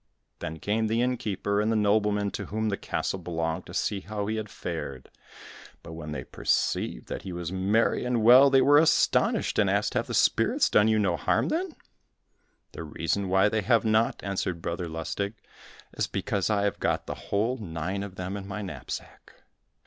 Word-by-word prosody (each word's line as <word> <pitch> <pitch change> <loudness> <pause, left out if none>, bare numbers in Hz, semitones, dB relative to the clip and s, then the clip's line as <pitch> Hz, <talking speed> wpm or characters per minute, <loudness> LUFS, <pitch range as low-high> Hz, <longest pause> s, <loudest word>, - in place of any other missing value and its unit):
Then 80 +1 -5
came 110 +6 0
the 110 +2 0
inn 125 0 +1
keeper, 100 -1 -1
and 110 +1 +1
the - - +1
nobleman 105 -1 +2
to - - -5
whom 110 +1 -2
the 100 - 0
castle 95 - -3
belonged, 85 0 -3
to - - -10
see 100 - 0
how 105 +1 -4
he 110 +2 -2
had 110 -1 -4
fared; 65 -9 -6 0.7
but 80 - -9
when 80 -2 -7
they 75 - -4
perceived - - -1
that - - -5
he 95 - -7
was 85 -1 -5
merry 100 +5 +1
and 125 -2 0
well 125 +4 +8
they 135 -1 +5
were 145 +1 +6
astonished, 165 +1 +2
and - - +3
asked, - - +1
"Have - - -1
the - - -3
spirits - - +3
done 105 0 +5
you 110 0 +3
no 95 -5 +1
harm, - - +1
then?" 340 0 -2 1.0
"The - - -8
reason 80 +5 -2
why 95 +2 +4
they 110 0 0
have 115 +2 +2
not," 110 +1 +1
answered 95 -3 -2
Brother 85 +1 -3
Lustig, 80 +6 -4 0.6
"is - - -1
because 100 0 -1
I 100 -2 +1
have 100 - -1
got - - 0
the - - -4 0.2
whole 110 +6 +1
nine 90 -1 -4
of 100 -2 -7
them 95 +1 -4
in 100 -1 -6
my 105 +1 -5
knapsack! 95 - -8
100 Hz, 195 wpm, -27 LUFS, 90-110 Hz, 1.0 s, well